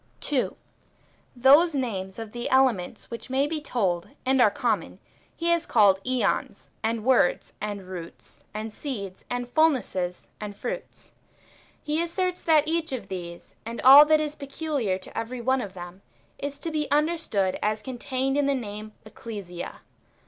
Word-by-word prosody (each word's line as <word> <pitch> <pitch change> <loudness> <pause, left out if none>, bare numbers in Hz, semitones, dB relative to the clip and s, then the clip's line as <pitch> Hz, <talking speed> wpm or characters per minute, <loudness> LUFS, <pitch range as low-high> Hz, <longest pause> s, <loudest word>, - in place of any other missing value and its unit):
^ - - -36
2. 275 -4 0 0.8
Those 285 +6 +6
names 195 -8 -3
of 225 -2 -7
the 240 +1 -4
elements 255 -10 +1
which 235 +3 -7
may 265 +2 +2
be 305 +1 -3
told, 190 - -1 0.2
and 265 0 +3
are 220 - +7
common, - - -1 0.4
he 335 0 0
has 340 -1 +2
called 200 -4 +4
iEons, 255 -1 -1
and 225 0 -1
words, 255 -9 +3
and 205 -1 -4
roots, 175 -3 -10
and 215 +1 -5
seeds, 205 -9 -6
and 245 0 -2
fulnesses, 245 - +1
and 210 -1 -6
fruits. - - -6 0.7
He 305 +2 0
asserts 360 +2 -1
that 310 -2 +4
each 330 -1 0
of 230 -7 -5
these, 175 -2 -7
and 230 +1 -6
all 275 +3 +11
that 310 0 +4
is 300 -1 -2
peculiar 280 - -2
to 190 - -11
every 245 +2 -4
one 260 +2 +1
of 195 -4 -7
them, 175 +1 -9 0.4
is 285 0 -4
to 325 +3 -4
be 305 -2 -1
understood 295 - +1
as 215 0 0
contained 260 +2 -2
in 290 -1 +2
the 280 - +2
name 215 -3 -6
Ecclesia. 200 -6 -8
245 Hz, 160 wpm, -26 LUFS, 205-290 Hz, 0.8 s, all